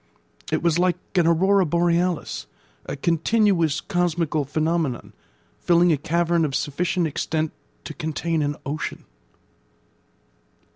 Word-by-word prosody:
It - - 0
was 170 -1 +2
like 180 -1 +2 0.2
an 175 -3 +3
aurora 190 +4 +4
borealis, 170 +1 0 0.4
a - - -3
continuous 170 +1 +2
cosmical 170 -5 0
phenomenon, 155 -2 -1 0.5
filling 175 0 +4
a 155 - +3
cavern 170 +2 +1
of 140 -4 -1
sufficient 170 +4 0
extent 155 +1 -2 0.3
to - - -7
contain 160 +1 -2
an 145 0 -1
ocean. 145 +2 -4
170 Hz, 110 wpm, -23 LUFS, 155-175 Hz, 0.5 s, aurora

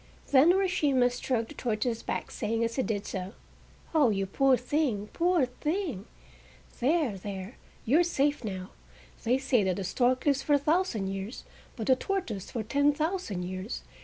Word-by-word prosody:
Then 285 +5 +7
Urashima 300 -10 +2
stroked 245 -2 -2
the - - -9
tortoise's 230 -2 -1
back, - - -4
saying 225 +2 -1
as 230 0 -1
he - - +3
did 210 -4 -2
so: 190 +1 -5 0.6
"Oh, 300 -6 +5
you 195 -2 0
poor 265 +7 +3
thing! 250 -5 -1
Poor 345 -4 +3
thing!—there, 270 - -3
there! 195 +3 -7 0.3
you 280 +8 +4
are - - +5
safe 290 -5 0
now! 190 -4 -5 0.5
They 245 +3 +3
say 265 -5 +2
that 190 -1 0
a 195 - -3
stork 250 +7 +1
lives 280 -2 +3
for 290 - +1
a - - +7
thousand 285 - 0
years, 195 +4 -5 0.3
but 225 - -4
the 260 - +5
tortoise 255 - -3
for 230 - -3
ten 285 +6 +2
thousand 310 - -2
years. 185 +4 -5
250 Hz, 165 wpm, -29 LUFS, 205-295 Hz, 0.6 s, Then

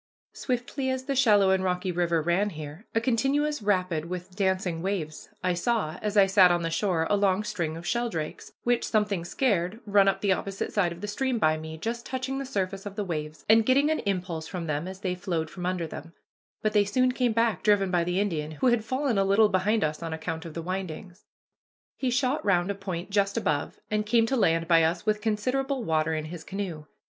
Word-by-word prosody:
Swiftly 255 +1 -2
as 260 0 -2
the 275 +1 -2
shallow 210 -7 +5
and 190 0 +2
rocky 180 0 -1
river 170 -2 +1
ran 180 +5 +1
here, 155 +3 -9
a - - +5
continuous 270 +5 +1
rapid 185 -6 0
with 180 +1 -7
dancing 190 -4 0
waves, 175 -5 -3
I 180 0 +2
saw, 175 -3 -1
as 210 0 -2
I 200 - +8
sat 190 -1 +6
on 175 -1 +1
the 165 - -2
shore, 170 -2 +1
a 205 - +2
long 200 0 +2
string 165 -6 -3
of 170 - -9
sheldrakes, 225 -9 -3
which 240 0 +1
something 210 -5 +1
scared, 190 0 0
run 200 -1 +4
up 195 - +1
the 200 - +2
opposite 195 +1 -2
side 185 -5 +2
of 170 +1 -9
the 210 - -4
stream 255 +4 -1
by 155 -7 +3
me, 160 0 -7
just 235 +7 -4
touching 265 +1 -3
the 275 - -5
surface 195 -4 -3
of 200 - -8
the 210 - -2
waves, 155 -4 -5
and 225 +1 +6
getting 275 +6 +3
an 315 - 0
impulse 180 -5 -3
from 180 -3 -5
them 150 +2 -2
as 190 0 -8
they 185 -3 -1
flowed 170 -4 -3
from 180 -1 -4
under 180 -2 -1
them; 165 +1 -9 0.5
but 215 -1 +1
they 205 -1 +5
soon 255 +5 +2
came 250 -1 +1
back, 230 -4 +1
driven 200 -3 +3
by 175 -2 +2
the 180 +2 0
Indian, 160 -7 -1
who 155 - 0
had 240 -2 +2
fallen 255 -2 0
a - - +4
little 200 +2 +4
behind 205 +4 +1
us 155 +1 -2
on 165 -1 -4
account 160 +1 -4
of 165 - -8
the 165 - -4
windings. 185 0 -6 0.7
He 260 - -1
shot 255 +3 0
round 190 -2 +2
a - - -1
point 190 -1 -5
just 200 +1 +1
above, 150 -10 -1
and 210 0 +1
came 225 +2 +3
to 265 - 0
land 165 -7 +2
by 165 -1 +5
us 165 +3 0
with 215 -1 +1
considerable 255 +5 -1
water 160 -2 +1
in 155 0 -3
his 165 +1 -8
canoe. 185 -6 -5
195 Hz, 220 wpm, -27 LUFS, 170-220 Hz, 0.7 s, I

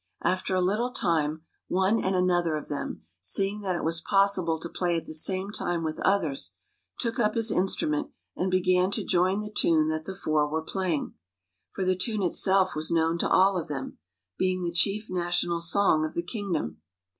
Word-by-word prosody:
After 185 +1 0
a 185 - +2
little 210 +7 +1
time, 160 - 0 0.2
one 190 +5 +1
and 190 0 0
another 175 -3 +1
of 150 - -8
them, 145 - -5 0.2
seeing 195 - +1
that 190 -3 -1
it - - -3
was 165 +1 0
possible 195 -4 +2
to 165 - -5
play 175 0 -1
at 165 - -5
the - - -8
same 190 +5 +1
time 175 -5 -2
with 155 -1 -3
others, 145 - 0 0.5
took 235 0 -1
up 215 -2 +2
his 230 -1 +3
instrument 155 -5 0 0.3
and 185 - -1
began 185 0 +2
to - - -1
join 185 +2 +1
the 210 0 -8
tune 155 -2 +3
that 155 0 -3
the 190 - -6
four 155 -5 0
were 160 +1 -2
playing, 180 -3 -2 0.6
for 190 - -4
the 185 0 +2
tune 210 +2 0
itself 190 +1 +2
was 155 +1 -1
known 165 0 +1
to - - +1
all 190 0 +4
of 165 - -6
them, 135 -3 -6 0.4
being 185 -1 0
the 170 - -1
chief 200 +5 +2
national 175 -1 -1
song 170 -2 +3
of 155 - -4
the 170 - -1
kingdom. 175 - -4
180 Hz, 190 wpm, -27 LUFS, 160-195 Hz, 0.6 s, all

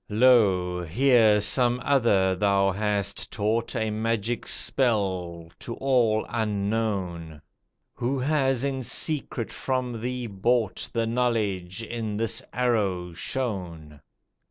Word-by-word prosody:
Lo! 100 -7 +3
here, 110 - +4
some 120 +4 +2
other 105 -9 +3
thou 100 0 +2
hast 100 0 -1
taught 110 +3 -1
A 110 -2 -1
magic 115 +1 -2
spell, 95 -9 -1
to 115 - -6
all 120 -5 +2
unknown; 100 -7 -2 0.5
Who 130 +3 -2
has 135 -2 +1
in 135 -1 -1
secret 130 -2 -1
from 125 -3 -3
thee 125 +1 -3
bought 110 +1 -1
The 115 -1 0
knowledge, 110 -5 -1
in 110 -2 -4
this 115 0 -2
arrow 100 -8 0
shown!" 85 - -5
110 Hz, 110 wpm, -26 LUFS, 95-120 Hz, 0.5 s, here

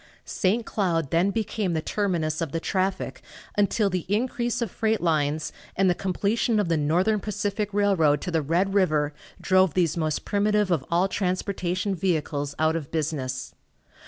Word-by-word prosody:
St. 220 +3 0
Cloud 165 -8 -1
then 170 +4 +3
became 210 -3 -1
the 160 - 0
terminus 170 -7 -1
of 165 -4 -2
the 165 - 0
traffic, 190 +2 -2 0.3
until 205 +1 +2
the 185 -2 -2
increase 240 +3 0
of 235 -6 -2
freight 220 0 0
lines 155 -2 0 0.2
and 190 -1 +3
the - - +3
completion 205 +5 0
of 200 -5 0
the 165 - +3
Northern 175 +8 +2
Pacific 210 0 -2
Railroad 190 -8 +3
to 180 - -4
the 165 -1 +1
Red 175 +7 +1
river 155 -7 +2 0.3
drove 185 -4 +3
these 170 -4 +2
most 155 -3 -1
primitive 210 -1 +1
of 160 -6 +1
all 175 +3 +3
transportation 185 0 -1
vehicles 150 -6 -1
out 160 +1 +2
of 155 -4 -4
business. 140 -5 -3
185 Hz, 160 wpm, -25 LUFS, 160-205 Hz, 0.3 s, then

